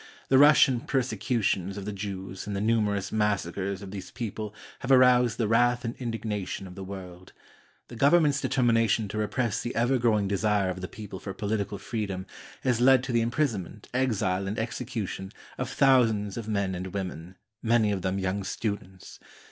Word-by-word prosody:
The 130 Hz, -, +6 dB
Russian 145 Hz, -3 st, +6 dB
persecutions 115 Hz, -7 st, -1 dB
of 100 Hz, -, -6 dB
the 105 Hz, -, -4 dB
Jews 95 Hz, -1 st, -6 dB
and 100 Hz, -, -3 dB
the -, -, -1 dB
numerous 105 Hz, -2 st, +1 dB
massacres 100 Hz, -2 st, -1 dB
of 95 Hz, -, -8 dB
these 95 Hz, -2 st, -7 dB
people 110 Hz, -3 st, -5 dB, 0.3 s
have 135 Hz, -, -6 dB
arous&d 125 Hz, -3 st, +5 dB
the 115 Hz, -, +1 dB
wrath 120 Hz, +2 st, +3 dB
and 115 Hz, -, -3 dB
indignation 110 Hz, -5 st, -4 dB
of 90 Hz, -, -10 dB
the 95 Hz, +1 st, -8 dB
world. 95 Hz, -2 st, -9 dB, 0.5 s
The 120 Hz, -, -10 dB
Gov 140 Hz, +6 st, +4 dB
ernment's 150 Hz, -5 st, +4 dB
determination 115 Hz, -3 st, +2 dB
to 110 Hz, -, -3 dB
repress 110 Hz, 0 st, -1 dB
the 120 Hz, -, -4 dB
ever 120 Hz, +3 st, +2 dB
growing 110 Hz, -4 st, +2 dB
desire 100 Hz, -1 st, +1 dB
of 95 Hz, 0 st, -7 dB
the 90 Hz, -, -4 dB
people 105 Hz, -2 st, -8 dB
for 95 Hz, -2 st, -7 dB
political 100 Hz, 0 st, -2 dB
freedom 100 Hz, -5 st, -4 dB, 0.4 s
has 125 Hz, -3 st, +1 dB
led 130 Hz, 0 st, +6 dB
to 130 Hz, -, -3 dB
the 120 Hz, -1 st, +3 dB
imprison 120 Hz, -2 st, 0 dB
ment, 100 Hz, +4 st, -13 dB
exile, 105 Hz, -7 st, 0 dB
and 100 Hz, -, -3 dB
execution 110 Hz, -5 st, -4 dB, 0.3 s
of -, -, -2 dB
thousands 115 Hz, -7 st, +3 dB
of 115 Hz, -2 st, -5 dB
men 100 Hz, -3 st, 0 dB
and 90 Hz, +1 st, -4 dB
women, 90 Hz, -2 st, -5 dB, 0.3 s
many 115 Hz, -2 st, +3 dB
of 100 Hz, -2 st, -2 dB
them 95 Hz, +1 st, -1 dB
young 95 Hz, +1 st, -1 dB
students. 95 Hz, -2 st, -5 dB
105 Hz, 180 wpm, -27 LUFS, 95-120 Hz, 0.5 s, The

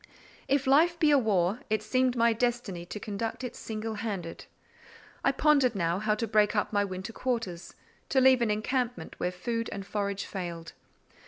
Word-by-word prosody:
If 275 Hz, 0 st, +2 dB
life 320 Hz, +6 st, +4 dB
be 310 Hz, -3 st, +4 dB
a 285 Hz, -, +6 dB
war, 200 Hz, -2 st, +1 dB
it 215 Hz, 0 st, 0 dB
seemed 255 Hz, +3 st, +1 dB
my 230 Hz, -1 st, +4 dB
destiny 225 Hz, -7 st, -2 dB
to 210 Hz, -, -6 dB
conduct 220 Hz, +4 st, -4 dB
it 250 Hz, -1 st, -5 dB
single 220 Hz, 0 st, -5 dB
handed. 200 Hz, -6 st, -5 dB, 0.8 s
I -, -, +4 dB
pondered 280 Hz, -6 st, +3 dB
now 170 Hz, -1 st, 0 dB
how 215 Hz, 0 st, +1 dB
to 230 Hz, +1 st, -2 dB
break 210 Hz, 0 st, +3 dB
up 205 Hz, -, 0 dB
my 205 Hz, 0 st, +3 dB
winter 190 Hz, +3 st, -5 dB
quarters—to 230 Hz, +1 st, -3 dB
leave 260 Hz, -1 st, +5 dB
an 235 Hz, -, +2 dB
encampment 230 Hz, -2 st, -1 dB
where 180 Hz, -, 0 dB
food 230 Hz, +5 st, -3 dB
and 195 Hz, -1 st, -5 dB
forage 200 Hz, -1 st, -2 dB
failed. 170 Hz, -3 st, -6 dB
220 Hz, 170 wpm, -29 LUFS, 195-250 Hz, 0.8 s, a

